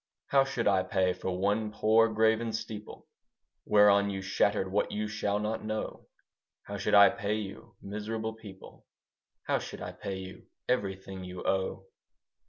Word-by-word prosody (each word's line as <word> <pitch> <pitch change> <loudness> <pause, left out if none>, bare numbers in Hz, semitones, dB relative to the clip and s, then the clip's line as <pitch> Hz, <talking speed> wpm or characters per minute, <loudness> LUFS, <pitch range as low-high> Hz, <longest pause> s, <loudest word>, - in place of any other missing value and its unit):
How 135 -1 +5
should 125 -5 -1
I 95 -2 +4
pay 95 0 +1
for 90 0 -4
one 105 +3 0
poor 110 +2 +4
graven 110 +1 +2
steeple 110 -1 -7 0.6
Whereon 100 -1 +5
you 95 -1 -4
shattered 95 0 +1
what 105 - 0
you 105 0 -2
shall 105 -1 -1
not 105 +1 -2
know? 110 0 -4 0.6
How 100 - -6
should 100 - +1
I 100 0 +9
pay 100 +1 -2
you, 105 +1 -7
miserable 110 +2 -4
people, 105 -4 -13 0.6
How - - +1
should - - -8
I 90 - -5
pay 95 +1 -5
you 95 0 -10 0.2
everything 95 -5 -2
you 90 0 -7
owe? 95 0 -1
105 Hz, 155 wpm, -30 LUFS, 95-110 Hz, 0.6 s, I